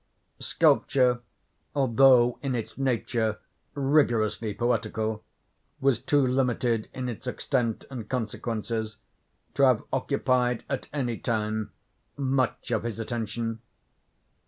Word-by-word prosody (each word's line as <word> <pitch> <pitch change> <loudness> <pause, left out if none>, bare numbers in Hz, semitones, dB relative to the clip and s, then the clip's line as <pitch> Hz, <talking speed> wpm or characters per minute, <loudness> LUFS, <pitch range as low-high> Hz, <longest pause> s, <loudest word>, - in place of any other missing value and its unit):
Sculpture, 125 -2 +3 0.6
although 130 -2 +5
in 135 -3 -1
its 115 -3 -4
nature 120 -4 0 0.4
rigorously 120 -7 +2
poetical 110 -1 -1 0.6
was 135 -3 +2
too 145 -2 +3
limited 125 -3 +1
in 130 -1 -4
its 120 +1 -6
extent 125 -3 -1
and 115 -5 -6
consequences, 110 -2 -3 0.6
to - - -1
have 130 -5 +5
occupied, 130 -3 +1
at 135 - -3
any 125 -6 -2
time, 110 -1 -1 0.5
much 135 -2 0
of - - +1
his 115 -1 -4
attention. 115 0 -3
120 Hz, 105 wpm, -27 LUFS, 110-130 Hz, 0.6 s, although